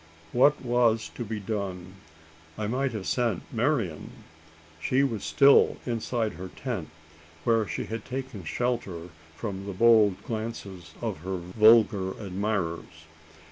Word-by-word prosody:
What 145 +4 +4
was 120 -2 +2
to 120 - -5
be 110 -1 -4
done? 95 -3 -4 0.6
I 110 - -2
might 130 +5 0
have 105 -4 -5
sent 115 -8 0
Marian. 115 - 0 0.7
She 130 +9 +2
was 115 -7 -1
still 140 0 +5
inside 115 -2 -1
her 95 +1 -7
tent, - - -5 0.5
where 115 -3 +2
she - - -3
had 115 +1 -5
taken 130 -6 -6
shelter 95 -4 -2 0.3
from 100 +1 -5
the 100 - -4
bold 105 -2 +4
glances 110 -6 -6
of - - -2
her 95 +3 -3
vulgar 100 +1 +4
admirers. 95 -5 -3
110 Hz, 130 wpm, -27 LUFS, 95-120 Hz, 0.7 s, still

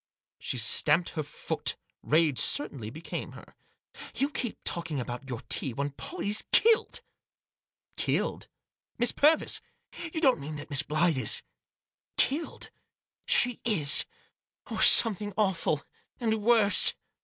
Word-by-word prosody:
She 130 - -4
stamped 150 +8 +2
her 155 - -4
foot; 150 0 -3 0.2
rage 155 -3 +1
certainly 135 -7 0
became 160 +8 -7
her. - - -15 0.6
"You 280 +2 -1
keep 245 -5 -4
talking 170 -4 -1
about 125 +2 -7
your 120 -3 -6
tea, 130 - 0
when 140 +4 -4
Pollie's 210 - -3
killed!" 455 +1 +2 0.5
" - - -48
Killed - - -2 0.3
— - - -54
Miss 240 +1 +3
Purvis 310 +2 +1 0.4
1 - - -6
You - - -1
don't 265 - +3
mean 150 +2 -7
that 145 +1 -9
Miss 140 - +4
Blyth 155 +1 0
is— 125 -5 +1 0.7
killed?" 305 +5 -1 0.3
" - - -52
She 245 -1 +5
is 155 -11 +3 0.3
!— - - -25
or - - -3
something 205 -3 +5
awful 185 -7 0 0.2
— - - -43
and 220 -3 -1
worse 215 -2 +4
170 Hz, 145 wpm, -27 LUFS, 145-235 Hz, 0.7 s, She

